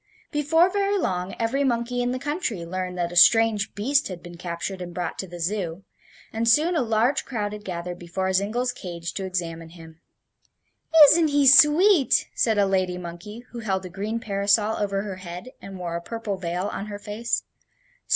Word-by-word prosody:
Before 325 Hz, +3 st, +3 dB
very 400 Hz, +1 st, 0 dB
long 185 Hz, -, -2 dB
every 240 Hz, +5 st, 0 dB
monkey 245 Hz, -1 st, -1 dB
in 245 Hz, -, 0 dB
the 255 Hz, -, -2 dB
country 270 Hz, -, -3 dB
learned 180 Hz, +1 st, -4 dB
that 175 Hz, -1 st, -1 dB
a -, -, -8 dB
strange 220 Hz, +2 st, +5 dB
beast 275 Hz, +8 st, +1 dB
had 180 Hz, -3 st, -8 dB
been 175 Hz, -1 st, -10 dB
captured 175 Hz, +2 st, -5 dB
and 175 Hz, -1 st, -7 dB
brought 175 Hz, -2 st, -4 dB
to 190 Hz, -, -4 dB
the 175 Hz, 0 st, -10 dB
Zoo; 180 Hz, 0 st, -3 dB, 0.5 s
and 230 Hz, +1 st, +1 dB
soon 310 Hz, +9 st, +3 dB
a 315 Hz, -, +2 dB
large 230 Hz, +3 st, +1 dB
crowd 210 Hz, -5 st, -4 dB
had 210 Hz, 0 st, -8 dB
gathered 175 Hz, -1 st, -5 dB
before 190 Hz, +2 st, -3 dB
Zingle's 220 Hz, +6 st, 0 dB
cage 170 Hz, -6 st, -7 dB
to 195 Hz, -, -4 dB
examine 165 Hz, -3 st, -4 dB
him. 160 Hz, -1 st, -14 dB, 1.0 s
"Isn't 320 Hz, +2 st, +5 dB
he 285 Hz, -1 st, +2 dB
sweet!" 300 Hz, -, +5 dB
said 220 Hz, -2 st, +1 dB
a 200 Hz, -, +4 dB
lady 185 Hz, -2 st, 0 dB
monkey 180 Hz, +6 st, -8 dB
who 240 Hz, -, -7 dB
held 190 Hz, -4 st, -2 dB
a -, -, -7 dB
green 205 Hz, +5 st, -4 dB
parasol 205 Hz, +1 st, +1 dB
over 200 Hz, -1 st, -1 dB
her 195 Hz, -3 st, -6 dB
head 180 Hz, +5 st, -8 dB
and 195 Hz, -1 st, -9 dB
wore 175 Hz, -2 st, -4 dB
a 170 Hz, -, -3 dB
purple 225 Hz, +1 st, -4 dB
veil 180 Hz, 0 st, -3 dB
on 200 Hz, -, -5 dB
her 205 Hz, -1 st, -6 dB
face. 210 Hz, +3 st, -3 dB
200 Hz, 190 wpm, -24 LUFS, 180-240 Hz, 1.0 s, strange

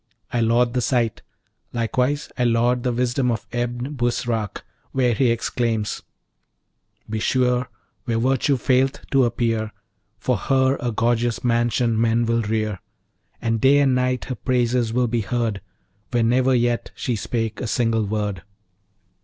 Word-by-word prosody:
I 120 Hz, -, +1 dB
laud 120 Hz, +1 st, +2 dB
the 125 Hz, -, +1 dB
site! 120 Hz, -2 st, 0 dB, 0.5 s
Likewise 125 Hz, +5 st, 0 dB
I 125 Hz, -, 0 dB
laud 120 Hz, +1 st, +2 dB
the 125 Hz, 0 st, 0 dB
wisdom 125 Hz, +1 st, 0 dB
of 115 Hz, -3 st, -2 dB
Ebn 120 Hz, +3 st, -3 dB
Busrac, 120 Hz, -4 st, -2 dB, 0.3 s
where 125 Hz, -2 st, +2 dB
he 120 Hz, +3 st, +2 dB
exclaims: 115 Hz, -2 st, -1 dB, 1.1 s
"Be 110 Hz, 0 st, -3 dB
sure, 125 Hz, +1 st, +1 dB, 0.4 s
where 115 Hz, -3 st, 0 dB
Virtue 135 Hz, +3 st, +2 dB
faileth 130 Hz, +2 st, +1 dB
to 135 Hz, -2 st, +4 dB
appear, 115 Hz, -2 st, -1 dB, 0.5 s
For 125 Hz, +2 st, 0 dB
her 130 Hz, +3 st, +2 dB
a 120 Hz, -, -1 dB
gorgeous 115 Hz, +1 st, 0 dB
mansion 120 Hz, -1 st, +1 dB
men 115 Hz, 0 st, +2 dB
will 115 Hz, 0 st, +1 dB
rear; 110 Hz, -2 st, -1 dB, 0.6 s
And 115 Hz, -1 st, 0 dB
day 135 Hz, +2 st, +6 dB
and 140 Hz, -2 st, +4 dB
night 125 Hz, 0 st, 0 dB
her 130 Hz, -, -4 dB
praises 120 Hz, -2 st, 0 dB
will 125 Hz, +2 st, +2 dB
be 115 Hz, 0 st, 0 dB
heard, 115 Hz, -2 st, -2 dB, 0.5 s
Where 120 Hz, -1 st, +1 dB
never 130 Hz, +3 st, +3 dB
yet 120 Hz, -1 st, 0 dB
she 125 Hz, -, -2 dB
spake 115 Hz, 0 st, -3 dB
a 125 Hz, -, -2 dB
single 115 Hz, -2 st, +1 dB
word."' 105 Hz, -3 st, -2 dB
120 Hz, 145 wpm, -22 LUFS, 115-125 Hz, 1.1 s, day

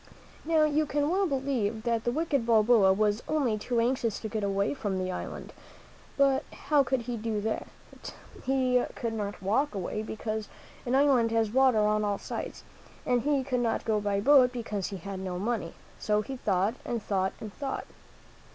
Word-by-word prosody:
Now, 320 Hz, -1 st, +3 dB
you 305 Hz, 0 st, +2 dB
can 290 Hz, +2 st, 0 dB
well 385 Hz, +1 st, +2 dB
believe 260 Hz, -7 st, -1 dB
that 230 Hz, -2 st, 0 dB
the 240 Hz, -, +2 dB
wicked 290 Hz, -2 st, 0 dB
Balboa 225 Hz, -3 st, +5 dB
was 210 Hz, +2 st, +1 dB
only 280 Hz, -8 st, +1 dB
too 235 Hz, +3 st, -1 dB
anxious 235 Hz, -2 st, 0 dB
to 220 Hz, -, -3 dB
get 215 Hz, -1 st, -3 dB
away 200 Hz, +2 st, 0 dB
from 205 Hz, -8 st, -3 dB
the 185 Hz, 0 st, -2 dB
island. -, -, -6 dB, 0.6 s
But 275 Hz, -1 st, +3 dB
how 295 Hz, -2 st, +2 dB
could 265 Hz, -1 st, 0 dB
he 235 Hz, 0 st, -4 dB
do 220 Hz, 0 st, -2 dB
it? 220 Hz, -, -7 dB, 0.3 s
He 255 Hz, -2 st, +2 dB
could 230 Hz, -1 st, -3 dB
not 205 Hz, -3 st, -4 dB
walk 225 Hz, +7 st, +1 dB
away, 195 Hz, +2 st, -3 dB
because 220 Hz, 0 st, -4 dB, 0.4 s
an 250 Hz, -, +2 dB
island 265 Hz, -5 st, +4 dB
has 225 Hz, -2 st, +1 dB
water 260 Hz, -1 st, +4 dB
on 210 Hz, 0 st, +2 dB
all 205 Hz, -1 st, 0 dB
sides, -, -, -6 dB, 0.4 s
and 245 Hz, -1 st, +2 dB
he 280 Hz, 0 st, +1 dB
could 255 Hz, -2 st, -1 dB
not 235 Hz, -2 st, -1 dB
go 215 Hz, -2 st, +1 dB
by 205 Hz, -1 st, 0 dB
boat, 260 Hz, 0 st, +6 dB
because 220 Hz, -6 st, -3 dB
he 200 Hz, -, -5 dB
had 195 Hz, +2 st, -6 dB
no 185 Hz, -1 st, -4 dB
money; 210 Hz, -3 st, -2 dB, 0.2 s
so 210 Hz, 0 st, +1 dB
he 265 Hz, +5 st, -6 dB
thought 200 Hz, -1 st, +1 dB
and 235 Hz, -3 st, -3 dB
thought 190 Hz, -1 st, 0 dB
and 215 Hz, -2 st, -8 dB
thought. 275 Hz, -2 st, -4 dB
230 Hz, 185 wpm, -29 LUFS, 210-265 Hz, 0.6 s, boat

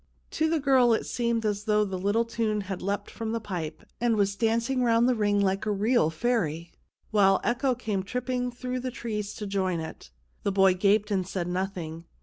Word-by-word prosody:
To 315 Hz, 0 st, +1 dB
the 325 Hz, -1 st, +1 dB
girl 260 Hz, -4 st, +4 dB
it -, -, 0 dB
seemed 235 Hz, -2 st, -1 dB
as 205 Hz, -1 st, -1 dB
though 210 Hz, -1 st, +3 dB
the 190 Hz, -2 st, -4 dB
little 205 Hz, +5 st, +1 dB
tune 225 Hz, -2 st, -1 dB
had 195 Hz, -1 st, -5 dB
leapt 200 Hz, +1 st, -3 dB
from 225 Hz, -1 st, -4 dB
the 230 Hz, -, 0 dB
pipe, 170 Hz, -7 st, -5 dB, 0.2 s
and 240 Hz, -2 st, +3 dB
was 200 Hz, -1 st, +1 dB
dancing 230 Hz, +4 st, +1 dB
round 235 Hz, 0 st, +4 dB
the 255 Hz, -, +4 dB
ring 205 Hz, -3 st, +1 dB
like 195 Hz, +1 st, 0 dB
a -, -, +2 dB
real 205 Hz, -4 st, +2 dB
fairy, 170 Hz, -4 st, -1 dB, 0.4 s
while 195 Hz, -3 st, +4 dB
echo 255 Hz, +2 st, +1 dB
came 215 Hz, -5 st, -2 dB
tripping 250 Hz, +4 st, -2 dB
through 250 Hz, +1 st, -4 dB
the 255 Hz, +1 st, -3 dB
trees 210 Hz, -4 st, -4 dB
to 210 Hz, -, -5 dB
join 190 Hz, -3 st, -1 dB
it. 160 Hz, -, -8 dB, 0.3 s
The 200 Hz, -, 0 dB
boy 195 Hz, -1 st, +5 dB
gaped 205 Hz, +3 st, +2 dB
and 190 Hz, -2 st, 0 dB
said 180 Hz, -3 st, -3 dB
nothing. 180 Hz, -3 st, -4 dB
210 Hz, 200 wpm, -27 LUFS, 195-235 Hz, 0.4 s, boy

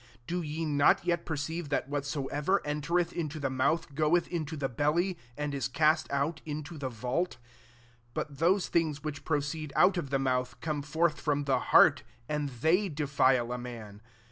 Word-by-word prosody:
do 175 Hz, +6 st, -2 dB
ye 160 Hz, +1 st, -3 dB
not 145 Hz, +2 st, +3 dB
yet 170 Hz, -1 st, 0 dB
perceive 160 Hz, +1 st, -3 dB
that 145 Hz, -, 0 dB
whatsoever 145 Hz, +5 st, -1 dB
enter 150 Hz, +4 st, 0 dB
eth 175 Hz, -, -1 dB
into 155 Hz, -2 st, -3 dB
the 135 Hz, -2 st, -1 dB
mouth 140 Hz, +4 st, 0 dB
goeth 155 Hz, +4 st, +2 dB
into 160 Hz, -3 st, -3 dB
the 140 Hz, -2 st, -1 dB
belly, 155 Hz, +9 st, +1 dB, 0.2 s
and 150 Hz, -1 st, -2 dB
is 140 Hz, -1 st, -1 dB
cast 155 Hz, +3 st, +2 dB
out 140 Hz, +3 st, -1 dB
into 155 Hz, +2 st, -6 dB
the 135 Hz, -2 st, -2 dB
vauh? 125 Hz, +9 st, -1 dB
18 -, -, -14 dB, 0.8 s
But 145 Hz, -2 st, -4 dB
those 180 Hz, +4 st, +3 dB
things 155 Hz, -3 st, 0 dB
which 150 Hz, -2 st, -5 dB
proceed 150 Hz, 0 st, -2 dB
out 190 Hz, -1 st, +5 dB
of 140 Hz, -6 st, -3 dB
the 135 Hz, -, +1 dB
mouth 130 Hz, -2 st, -1 dB
come 155 Hz, -2 st, -2 dB
forth 155 Hz, +1 st, 0 dB
from 145 Hz, -1 st, 0 dB
the 135 Hz, -2 st, +2 dB
heart; 150 Hz, -4 st, +7 dB, 0.3 s
and 150 Hz, -1 st, -1 dB
they 160 Hz, -, +1 dB
defile 135 Hz, -5 st, +2 dB
a 125 Hz, -, -3 dB
man. 110 Hz, -4 st, -8 dB
150 Hz, 180 wpm, -30 LUFS, 140-165 Hz, 0.8 s, heart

